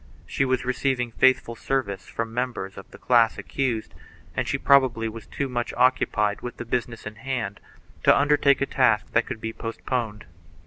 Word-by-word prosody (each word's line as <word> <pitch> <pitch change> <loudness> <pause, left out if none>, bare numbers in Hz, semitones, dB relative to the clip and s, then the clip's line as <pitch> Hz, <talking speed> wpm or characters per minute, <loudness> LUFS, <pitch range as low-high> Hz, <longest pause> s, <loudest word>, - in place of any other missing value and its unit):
She 135 - 0
was 130 -1 0
receiving 125 -1 0
faithful 125 -1 +3
service 100 -9 -2
from 115 0 -4
members 120 -6 -3
of - - -11
the - - -13
class 115 -3 +3
accused 125 -5 -2 0.4
and - - -1
she - - 0
probably 130 -5 +4
was 110 -1 -8
too 140 - -3
much 120 -2 -3
occupied 105 -5 +2
with 120 - -6
the 120 - -6
business 115 -1 -3
in 105 +1 -7
hand 115 -5 -3 0.5
to - - +7
undertake 145 -1 +3
a - - +3
task 120 -6 +2
that 115 - +2
could - - -5
be 115 0 -4
postponed. 115 -2 -4
120 Hz, 175 wpm, -25 LUFS, 110-130 Hz, 0.5 s, to